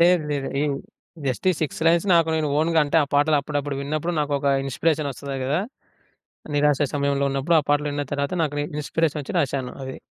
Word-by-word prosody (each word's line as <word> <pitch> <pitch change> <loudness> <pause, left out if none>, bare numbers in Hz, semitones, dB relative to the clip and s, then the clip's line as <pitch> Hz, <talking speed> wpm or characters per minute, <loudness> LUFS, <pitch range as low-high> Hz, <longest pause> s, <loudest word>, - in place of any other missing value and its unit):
లేదు, 175 0 +5
లేదు. 140 -2 -2
ఏమి 145 -2 0 0.5
జస్ట్ 130 +6 -2
ఈ - - +2
6 155 0 -2
లైన్స్ 170 +3 +4
నాకు 165 -1 +4
నేను 155 -1 0
ఓన్‌గా 165 +1 +2
అంటే 145 - 0
ఆ - - -11
పాటలు 145 +2 +4
అప్పుడప్పుడు 145 -1 -3
విన్నప్పుడు 155 +4 -2
నాకొక 145 -1 -1 0.2
ఇన్స్పిరేషన్ 150 +2 0
ఒస్తది 135 +1 -6
గదా! 140 +6 +1 0.9
నిరాశ 145 0 +3
సమయంలో 140 -1 +1
ఉన్నప్పుడు 140 +5 +1
ఆ - - -8
పాటలు 145 0 +2
విన్న 145 0 -2
తర్వాత 140 +4 -1
నాకు 145 -2 -1 0.2
ఇన్‌స్పిరేషనొచ్చి 150 0 -1
రాసాను 135 -4 -1
అది. 130 0 -6
145 Hz, 180 wpm, -23 LUFS, 140-155 Hz, 0.9 s, లేదు